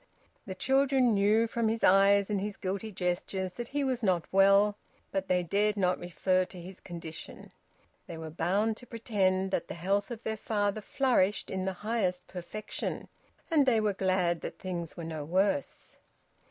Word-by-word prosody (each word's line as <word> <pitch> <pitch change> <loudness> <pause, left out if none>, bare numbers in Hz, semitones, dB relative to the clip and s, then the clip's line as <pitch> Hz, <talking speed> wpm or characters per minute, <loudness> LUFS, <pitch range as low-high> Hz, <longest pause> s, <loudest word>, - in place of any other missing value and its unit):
The 190 - -5
children 265 +1 +3
knew 210 +3 +3
from 230 0 -1
his 225 +1 -1
eyes 200 +2 +5
and 200 -2 0
his 205 0 -4
guilty 200 +3 -3
gestures 185 0 -2
that 240 +4 -6
he 285 +2 -1
was 260 -2 -1
not 185 -6 +1
well, 200 +2 +5 0.4
but 190 0 -2
they 180 -1 +2
dared 205 +4 +1
not 180 -2 +1
refer 185 +1 +1
to 185 0 -10
his 185 +2 -10
condition; 165 -3 -9 0.6
they 165 - -7
were 160 -1 -7
bound 200 +7 0
to 245 - -13
pretend 190 -5 0
that - - -1
the - - -6
health 195 +4 0
of 235 -2 -7
their 220 0 -2
father 205 -1 -1
flourished 215 -5 +1
in 190 -1 -2
the 190 - -1
highest 185 -6 0
perfection. 185 +4 -6 0.4
And 295 -4 +4
they 230 -3 +4
were 210 -1 +1
glad 185 -3 +1
that - - -6
things 175 -3 -5
were 170 - -5
no 160 -2 -5
worse. 180 -1 -1
195 Hz, 175 wpm, -30 LUFS, 180-215 Hz, 0.6 s, eyes